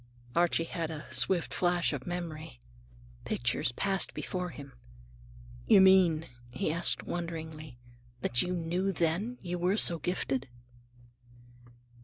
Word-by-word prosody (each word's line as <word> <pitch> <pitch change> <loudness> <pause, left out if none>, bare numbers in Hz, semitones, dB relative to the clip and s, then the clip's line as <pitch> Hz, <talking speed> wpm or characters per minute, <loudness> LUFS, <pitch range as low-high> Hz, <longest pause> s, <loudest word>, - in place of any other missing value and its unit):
Archie 170 -1 +3
had 165 -1 -4
a 155 -2 -7
swift 180 -3 +1
flash 175 -2 +1
of 135 -3 -6
memory. 165 - -6 0.6
Pictures 120 0 0
passed 195 +7 0
before 180 -1 -3
him. 140 -4 -11 0.9
"You - - +7
mean," 185 -4 +5 0.2
he 130 +5 -2
asked 170 +2 +3
wonderingly, 160 -5 -6 0.4
"that 120 -1 +2
you 180 - -2
knew 180 +2 -1
then 175 +7 -1
that 250 - -22
you 175 0 -3
were 185 +4 +1
so 170 -5 +5
gifted?" 135 -5 -2
170 Hz, 125 wpm, -30 LUFS, 155-180 Hz, 0.9 s, You